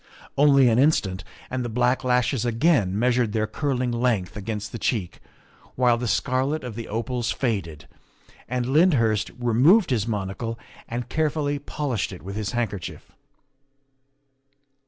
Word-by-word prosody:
Only 140 -2 +5
an 115 0 +3
instant, 100 -11 +2 0.3
and 130 0 -2
the 120 - -3
black 125 +3 +1
lashes 125 -1 +1
again 115 - +2
measured 120 -1 +1
their 110 -1 +1
curling 130 +1 -1
length 115 -6 0
against 105 -1 -5
the 115 - -6
cheek, 100 -4 -2 0.6
while 125 -2 +4
the 120 +1 -3
scarlet 135 +6 0
of 125 -3 -6
the 115 +1 -6
opals 120 +2 -2
faded, 95 - -3 0.6
and 125 0 -1
Lyndhurst 125 - +3
removed 130 - +4
his 115 -3 0
monocle 105 +2 -3 0.3
and 120 +1 -4
carefully 150 -2 -1
polished 140 -8 -3
it 90 - -10
with 100 +2 -6
his 105 0 -3
handkerchief. 105 -6 -4
120 Hz, 135 wpm, -24 LUFS, 110-130 Hz, 0.6 s, Only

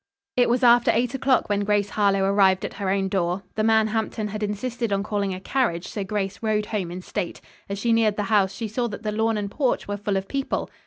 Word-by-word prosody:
It 245 -1 +3
was 245 +2 +1
after 240 0 +6
eight 240 +2 0
o'clock 265 -1 +2
when 205 -1 +1
Grace 205 0 +1
Harlowe 200 -2 +2
arrived 195 -1 +3
at - - -5
her 195 - 0
own 195 0 +1
door. 185 0 -1
The 215 - -1
man 220 0 +4
Hampton 220 -1 -2
had 215 +1 -5
insisted 225 +2 -2
on 200 0 +1
calling 205 -2 -1
a 185 - -4
carriage, 190 -5 -1
so 205 - -3
Grace 195 0 -3
rode 215 -1 0
home 205 -5 -3
in 180 +1 -7
state. 175 - -4 0.3
As 200 - -3
she 230 +3 +1
neared 220 -2 +3
the 210 - -1
house 200 -2 +2
she 225 - -5
saw 240 +3 -1
that 215 0 -7
the 215 - -1
lawn 220 +1 +1
and 200 -1 -3
porch 265 0 0
were 205 0 -3
full 205 -1 -1
of 190 0 -3
people. 275 -1 -2
210 Hz, 245 wpm, -24 LUFS, 195-225 Hz, 0.3 s, after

